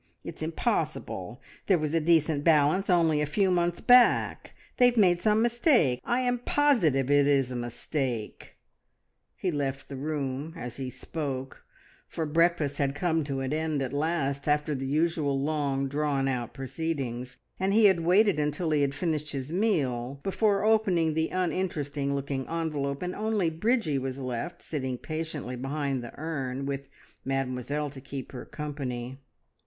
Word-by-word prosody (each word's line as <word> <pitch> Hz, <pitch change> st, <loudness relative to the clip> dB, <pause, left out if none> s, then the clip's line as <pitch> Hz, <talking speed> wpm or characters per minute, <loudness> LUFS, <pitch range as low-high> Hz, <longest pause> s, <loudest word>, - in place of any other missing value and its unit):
It's -, -, -8 dB
impossible, -, -, -2 dB, 0.2 s
there 190 Hz, -, +5 dB
was 155 Hz, -1 st, -2 dB
a 165 Hz, -, +3 dB
decent 160 Hz, -2 st, +2 dB
balance 160 Hz, +5 st, +3 dB
only 165 Hz, -4 st, +3 dB
a 150 Hz, -, 0 dB
few 190 Hz, +5 st, +2 dB
months 175 Hz, -1 st, +1 dB
back! 245 Hz, -1 st, +4 dB, 0.2 s
They 250 Hz, -, +7 dB
have 245 Hz, -1 st, 0 dB
made 180 Hz, -5 st, +5 dB
some 215 Hz, +3 st, +3 dB
mistake. 235 Hz, -, +3 dB
I 245 Hz, +2 st, +1 dB
am 245 Hz, -1 st, 0 dB
positive 190 Hz, -, +2 dB
it 145 Hz, 0 st, +5 dB
is 135 Hz, -3 st, +2 dB
a -, -, -4 dB
mistake." 120 Hz, -1 st, -4 dB, 0.8 s
He 185 Hz, -, -1 dB
left 140 Hz, -2 st, -3 dB
the 140 Hz, -, -6 dB
room 140 Hz, +1 st, -3 dB
as 120 Hz, -5 st, -7 dB
he 130 Hz, -2 st, -4 dB
spoke, 135 Hz, -2 st, -5 dB, 0.4 s
for 160 Hz, -, -3 dB
breakfast 160 Hz, -2 st, +2 dB
had 140 Hz, -1 st, 0 dB
come 160 Hz, 0 st, +1 dB
to 135 Hz, -2 st, -3 dB
an 135 Hz, +2 st, -2 dB
end 155 Hz, -2 st, -1 dB
at 130 Hz, 0 st, -4 dB
last, 145 Hz, -2 st, -1 dB
after 150 Hz, +1 st, +1 dB
the 135 Hz, -1 st, -3 dB
usual 150 Hz, -1 st, +1 dB
long 140 Hz, -2 st, 0 dB
drawn 140 Hz, -1 st, 0 dB
out 125 Hz, -3 st, -2 dB
proceedings, 135 Hz, -3 st, -4 dB, 0.2 s
and 190 Hz, +1 st, +1 dB
he 215 Hz, +1 st, +5 dB
had 190 Hz, -4 st, +5 dB
waited 185 Hz, +2 st, +4 dB
until 150 Hz, +3 st, -1 dB
he 150 Hz, -1 st, +3 dB
had 140 Hz, -1 st, 0 dB
finished 155 Hz, -1 st, -2 dB
his 135 Hz, +1 st, -4 dB
meal 140 Hz, -, 0 dB
before 200 Hz, +1 st, +1 dB
opening 190 Hz, -8 st, +3 dB
the 160 Hz, +1 st, 0 dB
uninteresting 150 Hz, -6 st, -1 dB
looking 135 Hz, -1 st, -3 dB
envelope, 150 Hz, -3 st, -2 dB
and 180 Hz, 0 st, -3 dB
only 210 Hz, -6 st, 0 dB
Bridgie 165 Hz, -, +1 dB
was 130 Hz, 0 st, -4 dB
left, 130 Hz, +6 st, -5 dB
sitting 130 Hz, -5 st, -3 dB
patiently 155 Hz, -4 st, -5 dB
behind 135 Hz, 0 st, -2 dB
the 120 Hz, -, -8 dB
urn, 135 Hz, -4 st, -3 dB
with 140 Hz, 0 st, -4 dB, 0.4 s
Mademoiselle 135 Hz, +2 st, -2 dB
to 135 Hz, -1 st, -10 dB
keep 135 Hz, -1 st, -7 dB
her 130 Hz, -, -7 dB
company. 130 Hz, -4 st, -5 dB
150 Hz, 160 wpm, -28 LUFS, 135-170 Hz, 0.8 s, They